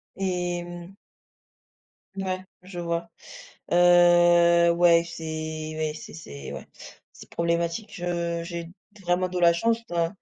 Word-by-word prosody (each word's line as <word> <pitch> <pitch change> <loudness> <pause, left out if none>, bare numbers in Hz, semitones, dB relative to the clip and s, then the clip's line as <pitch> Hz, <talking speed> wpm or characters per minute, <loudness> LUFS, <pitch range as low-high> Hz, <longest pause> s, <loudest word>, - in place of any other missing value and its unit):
Et 180 -2 -2
mmh. 175 +2 -10 1.2
Ouais, 185 -1 -3 0.2
je 180 -1 -9
vois. 170 0 -3 0.6
Heu, 175 -1 +5
ouais, 170 0 +4
c'est 165 -1 -9 0.5
ouais, 155 -1 -1
c'est - - -10
c'est 70 - -9
ouais, - - -8 0.5
c'est - - -14
problématique. 170 +5 -2
Heu, 170 -1 -2
j'ai 170 -1 -6 0.3
vraiment 180 +1 +1
de 180 0 -4
la 170 -1 +5
chance, 225 +7 +1
ouais. 170 -1 +1
175 Hz, 125 wpm, -25 LUFS, 170-175 Hz, 1.2 s, Heu